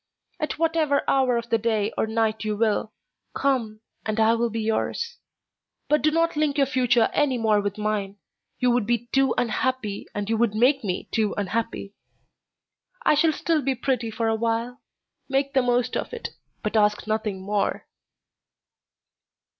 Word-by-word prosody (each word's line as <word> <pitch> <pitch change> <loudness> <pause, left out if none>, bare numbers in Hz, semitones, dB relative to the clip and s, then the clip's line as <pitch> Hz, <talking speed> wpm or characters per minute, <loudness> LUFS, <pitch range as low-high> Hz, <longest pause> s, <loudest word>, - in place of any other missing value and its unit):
At 305 - -2
whatever 320 -3 +1
hour 260 -3 +3
of 235 0 -5
the 230 - +3
day 220 -1 0
or - - 0
night 220 0 0
you 215 -1 -2
will, 220 0 +1 0.4
come, 230 -6 0 0.2
and 215 0 -2
I 220 +1 +5
will 235 0 +1
be 225 0 -3
yours; 465 - -2 0.7
but 300 - +3
do 310 - +4
not 330 +1 +1
link 300 -1 +1
your 280 - +4
future 250 -3 +2
any 285 -4 +2
more 215 -3 +2
with 205 0 -3
mine, 210 -2 -2 0.4
you 250 -1 +2
would 240 -3 +1
be 240 0 0
too 270 -1 +3
unhappy 245 -3 -1
and 205 -1 -2
you 225 0 +1
would 225 -2 +1
make 260 +4 +3
me 185 -3 -3
too 215 -2 0
unhappy. 205 0 -3 1.1
I - - +5
shall 315 +2 +4
still 315 0 0
be 270 0 0
pretty 250 -2 -1
for 225 +1 -2
a 225 - +2
while; 230 +3 -2 0.5
make 275 +1 0
the 265 - +4
most 245 -1 +1
of - - -3
it, 475 - -5 0.3
but 215 0 -2
ask 210 -1 +2
nothing 215 -2 -2
more." 200 +1 -1
230 Hz, 170 wpm, -24 LUFS, 215-270 Hz, 1.1 s, I